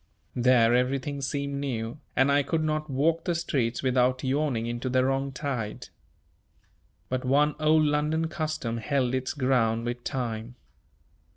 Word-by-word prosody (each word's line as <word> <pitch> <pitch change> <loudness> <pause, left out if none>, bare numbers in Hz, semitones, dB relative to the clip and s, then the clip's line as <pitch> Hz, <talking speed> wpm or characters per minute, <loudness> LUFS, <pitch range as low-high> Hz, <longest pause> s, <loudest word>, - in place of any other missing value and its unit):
There 120 -2 +4
everything 135 +3 0
seemed 140 0 -2
new, 120 -1 -3 0.2
and 130 +2 +4
I 145 +1 +4
could 160 +3 -1
not 155 0 -1
walk 160 +5 +1
the 175 - 0
streets 130 -8 -1
without 130 0 +2
yawing 135 -3 0
into 120 +2 -3
the 130 0 +2
wrong 135 +1 0
tide. 130 -7 -4 1.2
But 130 0 -2
one 145 +3 +3
old 155 0 +4
London 150 +2 +1
custom 155 -8 -3
held 125 +1 0
its 130 +2 -2
ground 120 -4 +1
with 120 0 -4
time. 120 -2 -4
135 Hz, 145 wpm, -27 LUFS, 125-150 Hz, 1.2 s, There